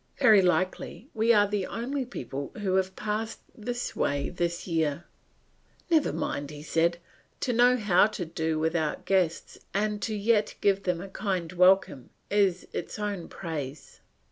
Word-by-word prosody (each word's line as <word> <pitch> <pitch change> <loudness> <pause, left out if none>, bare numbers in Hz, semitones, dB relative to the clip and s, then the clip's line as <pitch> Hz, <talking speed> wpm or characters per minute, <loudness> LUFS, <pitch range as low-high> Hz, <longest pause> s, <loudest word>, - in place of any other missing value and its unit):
Very 210 -3 +6
likely 185 - -1
we 225 +1 +3
are 205 -3 +5
the 200 -2 -2
only 260 +3 -3
people 140 - -6
who 200 -3 -1
have 190 0 0
passed 215 +1 -3
this 240 +3 -4
way 140 0 0
this 175 -1 -2
year." 160 -2 0 0.9
"Never 315 -3 +4
mind," 140 0 -3 0.2
said 170 +2 +2
he, 170 - -22 0.4
"to 250 - 0
know 245 +2 +5
how 205 -3 +4
to 205 -5 -5
do 160 -1 -2
without 160 -1 -1
guests 180 -4 0 0.2
and 210 0 0
yet 210 0 +2
to - - -11
give 200 -1 +2
them 180 -2 0
a 195 - -7
kind 190 -3 -3
welcome, 180 -7 +3 0.2
is 195 -3 +2
its - - -4
own 205 -4 -3
praise." 150 -5 -6
190 Hz, 155 wpm, -28 LUFS, 170-210 Hz, 0.9 s, Very